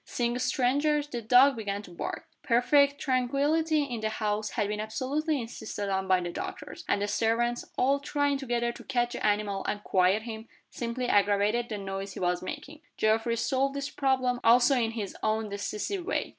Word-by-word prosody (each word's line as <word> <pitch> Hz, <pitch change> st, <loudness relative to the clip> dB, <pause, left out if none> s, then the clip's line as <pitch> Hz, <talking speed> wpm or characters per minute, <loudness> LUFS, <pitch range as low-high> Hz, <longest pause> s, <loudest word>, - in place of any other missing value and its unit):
Seeing 240 Hz, 0 st, -2 dB
strangers, 285 Hz, +4 st, +1 dB
the 245 Hz, -5 st, -5 dB
dog 250 Hz, +5 st, +6 dB
began 205 Hz, -2 st, -4 dB
to 180 Hz, -, -13 dB
bark. 170 Hz, -, -5 dB
Perfect 280 Hz, +4 st, +3 dB
tranquillity 290 Hz, +5 st, +1 dB
in 245 Hz, -5 st, -4 dB
the 220 Hz, 0 st, -1 dB
house 215 Hz, -1 st, -2 dB
had 205 Hz, -, -1 dB
been 210 Hz, 0 st, -3 dB
absolutely 280 Hz, +8 st, -1 dB
insisted 215 Hz, -3 st, -5 dB
on 190 Hz, 0 st, -1 dB
by 185 Hz, -1 st, +4 dB
the 175 Hz, 0 st, -4 dB
doctors; -, -, -7 dB
and 200 Hz, -, +1 dB
the -, -, 0 dB
servants, 235 Hz, +3 st, 0 dB
all 275 Hz, +2 st, +3 dB
trying 285 Hz, 0 st, 0 dB
together 240 Hz, -3 st, -1 dB
to -, -, -12 dB
catch 240 Hz, -2 st, 0 dB
the -, -, -5 dB
animal 205 Hz, -2 st, 0 dB
and 205 Hz, 0 st, -3 dB
quiet 190 Hz, +3 st, +2 dB
him, 225 Hz, -1 st, -7 dB, 0.2 s
simply 240 Hz, +1 st, -3 dB
aggravated 205 Hz, +3 st, +2 dB
the 215 Hz, -, -3 dB
noise 195 Hz, 0 st, -5 dB
he -, -, -6 dB
was 180 Hz, -1 st, 0 dB
making. 295 Hz, +11 st, -7 dB, 0.2 s
Geoffrey 225 Hz, +2 st, +2 dB
solved 275 Hz, +3 st, 0 dB
this 280 Hz, 0 st, -3 dB
problem 260 Hz, -2 st, +1 dB
also 245 Hz, +4 st, +5 dB
in 235 Hz, -3 st, +1 dB
his 210 Hz, -4 st, -5 dB
own 220 Hz, 0 st, 0 dB
decisive 210 Hz, -, -3 dB
way. -, -, -2 dB
235 Hz, 185 wpm, -28 LUFS, 210-270 Hz, 0.2 s, dog